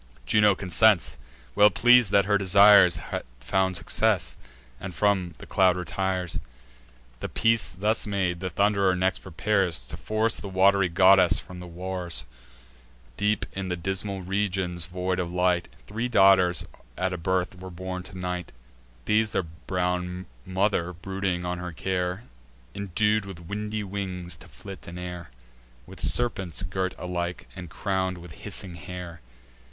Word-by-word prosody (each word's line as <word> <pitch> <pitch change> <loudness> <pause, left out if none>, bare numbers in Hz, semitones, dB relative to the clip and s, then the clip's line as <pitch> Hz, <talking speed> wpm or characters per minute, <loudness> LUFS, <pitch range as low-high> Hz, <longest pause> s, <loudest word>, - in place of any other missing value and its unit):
Juno 105 -2 +4
consents, 95 +1 +3 0.4
well 105 +10 +6
pleas'd 120 +1 +5
that 100 0 +4
her 100 0 +2
desires 100 -1 +7
Had - - -5 0.2
found 95 +8 0
success, - - +1 0.4
and 95 -2 -7
from 90 -1 +1
the - - -11
cloud 95 -2 +3
retires. 90 +1 -2 0.8
The - - -5
peace 115 -1 +2
thus 105 +4 0
made, 95 -4 -1
the 95 0 -3
Thund'rer 100 -1 +2
next 95 +1 0
prepares 95 -5 -1
To - - -7
force 110 +1 0
the 100 - -7
wat'ry 95 0 +3
goddess 95 +1 +5
from 90 -1 -8
the 90 - -9
wars. 90 0 -4 0.9
Deep 105 +5 0
in 95 -1 -4
the 90 - -1
dismal 95 +2 -3
regions 95 -3 -2
void 90 +1 -2
of 85 -1 -2
light, 90 -1 +1 0.2
Three 115 +4 -3
daughters 95 -6 +4 0.3
at 95 0 -1
a - - -3
birth 90 +1 -1
were 95 0 -8
born 90 +1 -6
to 95 - -11
Night: 90 -1 -4 0.5
These 110 0 +2
their 95 - -1
brown 90 +2 -3 0.2
mother, 95 -2 0
brooding 95 0 -3
on 90 0 -3
her 90 -1 -6
care, 90 +3 -2 0.5
Indued 100 +1 0
with 95 -4 -8
windy 105 +4 -4
wings 95 -3 -5
to 85 - -15
flit 95 +4 -11
in 85 +1 -8
air, 90 -3 -7 0.6
With - - -12
serpents 95 -7 +2
girt 95 +1 -2
alike, 90 0 -4
and 90 -3 -8
crown'd 95 0 -2
with 85 -1 -11
hissing 95 +1 -5
hair. 90 0 -8
95 Hz, 145 wpm, -26 LUFS, 90-100 Hz, 0.9 s, desires